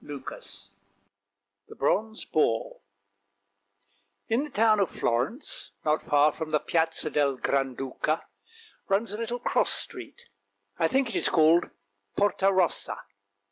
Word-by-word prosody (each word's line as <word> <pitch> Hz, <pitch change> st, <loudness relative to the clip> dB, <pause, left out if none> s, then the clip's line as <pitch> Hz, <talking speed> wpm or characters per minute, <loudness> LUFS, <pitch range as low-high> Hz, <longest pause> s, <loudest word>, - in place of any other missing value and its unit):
ft -, -, -16 dB
wrrrw 100 Hz, -6 st, -8 dB, 1.0 s
THE -, -, -12 dB
BRONZE 220 Hz, +10 st, 0 dB
BOAR 115 Hz, -7 st, 0 dB, 1.5 s
IN 230 Hz, +4 st, +2 dB
the 300 Hz, -, -6 dB
town 220 Hz, -3 st, +3 dB
of 195 Hz, -, +2 dB
Florence, 125 Hz, -, -2 dB
not 155 Hz, 0 st, +2 dB
far 145 Hz, +1 st, +3 dB
from 160 Hz, +1 st, -6 dB
the 155 Hz, -1 st, +2 dB
Piazza 160 Hz, -2 st, 0 dB
del 140 Hz, -3 st, +1 dB
Granduca, 135 Hz, +3 st, -1 dB, 0.7 s
runs 200 Hz, +2 st, +1 dB
a 210 Hz, -, -4 dB
little 235 Hz, +1 st, -2 dB
cross 245 Hz, -, +1 dB
street, 485 Hz, -, -3 dB, 0.6 s
I -, -, +4 dB
think 265 Hz, 0 st, +1 dB
it 220 Hz, -, -5 dB
is -, -, +2 dB
called 165 Hz, +1 st, +4 dB, 0.5 s
Porta 195 Hz, -1 st, +3 dB
Rossa. 185 Hz, -3 st, +1 dB
165 Hz, 130 wpm, -27 LUFS, 145-215 Hz, 1.5 s, I